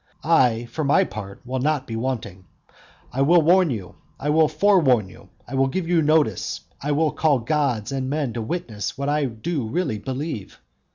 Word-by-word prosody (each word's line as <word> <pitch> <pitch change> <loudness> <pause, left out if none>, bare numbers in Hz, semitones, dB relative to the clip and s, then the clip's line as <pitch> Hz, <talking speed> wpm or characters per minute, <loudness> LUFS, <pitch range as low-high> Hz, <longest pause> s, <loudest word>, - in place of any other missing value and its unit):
I, 125 -8 +3
for 120 +7 -4
my 140 - +4
part, 100 -1 -8
will 130 +1 -3
not 145 0 0
be 115 - -6
wanting. 115 -6 -4 0.7
I 135 - -1
will 165 +4 +5
warn 180 +2 +5
you, 105 -8 -5 0.2
I 145 +2 -1
will 160 0 +5
forewarn 155 - +3
you, - - -16 0.2
I 125 - -9
will 135 0 +2
give 170 +5 -3
you 170 -1 +3
notice, 150 - +1 0.2
I 145 - -1
will 150 +1 +2
call 150 -1 +2
gods 130 -3 -1
and 130 -1 -2
men 145 -4 -1
to 115 - -3
witness 110 - -4
what 140 +1 -2
I 150 0 +1
do 130 +2 -3
really 150 -8 -1
believe. 130 - -5
140 Hz, 185 wpm, -23 LUFS, 115-155 Hz, 0.7 s, will